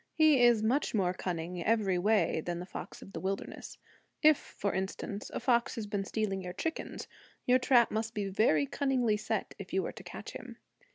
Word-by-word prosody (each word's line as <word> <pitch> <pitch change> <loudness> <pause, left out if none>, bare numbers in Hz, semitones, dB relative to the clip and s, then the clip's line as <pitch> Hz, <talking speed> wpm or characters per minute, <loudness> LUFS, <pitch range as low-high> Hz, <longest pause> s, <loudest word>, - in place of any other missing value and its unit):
He 310 -5 +5
is 240 -3 +5
much 250 +3 +1
more 185 -3 +2
cunning 175 -1 -4
every 205 -4 +2
way 205 -4 +2
than 175 -1 -3
the 175 - -5
fox - - -8
of 195 - -13
the - - -4
wilderness. 195 +1 -4 0.5
If, 310 0 +8
for 200 - -4
instance, 190 +2 -4
a - - -3
fox 240 -2 +2
has 225 - -4
been 200 -1 -2
stealing 195 -2 -1
your 180 -1 -6
chickens, 320 - -4 0.4
your 250 +1 +5
trap 245 -2 +4
must 220 +1 -2
be 205 -1 -1
very 190 -7 +3
cunningly 250 - +1
set 210 - -2
if - - -9
you - - +1
are - - -3
to - - -11
catch - - -8
him. - - -9
210 Hz, 195 wpm, -31 LUFS, 190-240 Hz, 0.5 s, If